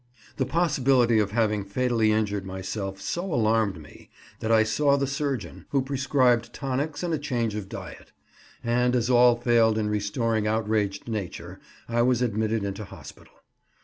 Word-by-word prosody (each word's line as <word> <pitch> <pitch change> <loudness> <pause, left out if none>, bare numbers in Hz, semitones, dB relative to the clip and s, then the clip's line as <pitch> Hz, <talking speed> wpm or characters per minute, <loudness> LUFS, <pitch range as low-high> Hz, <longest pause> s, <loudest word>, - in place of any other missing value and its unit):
The 130 - 0
possibility 130 -7 +3
of 105 -2 +1
having 105 -1 0
fatally 115 +1 +1
injured 105 -2 0
myself 95 +1 -5
so 175 - -3
alarmed 110 - +1
me 75 -1 -15 0.3
that 110 - -2
I 110 -1 +5
saw 140 +5 +2
the 140 - 0
surgeon, 140 -4 -4
who 135 -2 +1
prescribed 130 -3 +1
tonics 140 +4 -3
and 170 -2 -1
a 155 - 0
change 120 -7 -1
of 105 -2 -5
diet; - - -9 0.5
and, 125 +1 +1
as 120 0 +1
all 120 0 +6
failed 115 -2 +3
in 105 -1 0
restoring 105 +1 0
outraged 105 -2 -1
nature, 105 -6 -5 0.3
I 120 0 +1
was 125 0 +2
admitted 110 -1 0
into 100 +1 -4
hospital. - - -13
115 Hz, 155 wpm, -26 LUFS, 105-130 Hz, 0.5 s, all